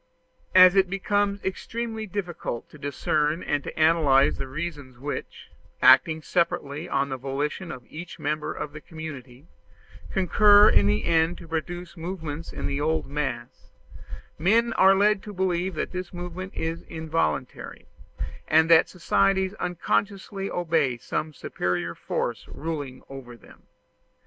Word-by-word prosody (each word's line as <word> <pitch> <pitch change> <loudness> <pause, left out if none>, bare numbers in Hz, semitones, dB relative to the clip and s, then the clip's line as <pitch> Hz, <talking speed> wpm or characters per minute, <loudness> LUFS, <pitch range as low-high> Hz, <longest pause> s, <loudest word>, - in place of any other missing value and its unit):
As 185 0 +9
it 190 -2 +4
becomes 200 +1 0
extremely 220 +3 -4
difficult 175 - -4
to 150 - -14
discern 150 +3 0
and 145 -1 -1
to - - -7
analyze 150 -5 +4
the 135 - -4
reasons 145 -3 -6
which, 145 +3 -6 0.3
acting 155 +5 +6
separately 170 -2 -1
on 140 0 0
the 130 - -3
volition 145 +6 -3
of 125 - -9
each 170 +2 -9
member 150 +1 -2
of 145 - -5
the 150 - -9
community, 140 -5 -9 0.7
concur 205 +3 +6
in 100 - +4
the 105 +1 +1
end 165 +1 +2
to 170 - -12
produce 175 +2 -4
movement 165 -3 -6
in - - -5
the 140 +1 -2
old 160 +1 0
mass, 135 -5 -5 0.7
men 225 +7 +3
are 190 -2 +6
led 205 0 +3
to 210 - -9
believe 185 -1 -1
that - - -3
this 185 -1 -5
movement 180 +1 -7
is 165 +1 -3
involuntary, 160 - -3 0.6
and 160 +2 +4
that 165 -1 +6
societies 190 +2 +1
unconsciously 195 +2 -2
obey 160 -8 0
some 155 +6 -3
superior 90 - -3
force - - -3
ruling 145 -5 -5
over 130 -3 -10
them. - - -19
160 Hz, 140 wpm, -25 LUFS, 145-185 Hz, 0.7 s, As